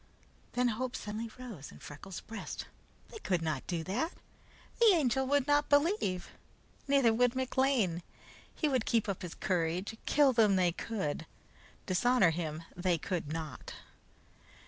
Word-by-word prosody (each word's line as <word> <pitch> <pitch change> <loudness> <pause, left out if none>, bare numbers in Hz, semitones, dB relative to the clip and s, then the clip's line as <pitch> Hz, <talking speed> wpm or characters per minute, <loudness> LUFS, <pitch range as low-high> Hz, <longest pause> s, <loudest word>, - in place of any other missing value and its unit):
Then 245 0 +2
hope 245 +3 -2
suddenly 215 +2 -4
rose 230 - -8
high - - -13
in - - -14
Freckles' 155 +5 -8
breast. 225 - -6 0.4
They 445 - -9
could 180 - 0
not 155 -5 -2
do 170 -3 -2
that! 240 - -1 0.7
The 470 - +6
Angel 265 -4 +2
would 285 -1 +3
not 290 0 +3
believe. 285 - +2 0.6
Neither 275 -5 +4
would 245 +2 +3
McLean. 260 -9 +1 0.5
He 310 - +1
would 260 -5 0
keep 230 -3 +2
up 200 -3 -3
his 175 -2 -6
courage. 180 +3 -1
Kill 285 -2 +5
him 215 -4 +5
they 180 -2 +3
could; 170 -5 -3 0.6
dishonor 195 0 +4
him 160 -1 -4
they 180 -1 +1
could 165 -2 -3
not. 160 -2 -5
220 Hz, 145 wpm, -32 LUFS, 175-260 Hz, 0.7 s, The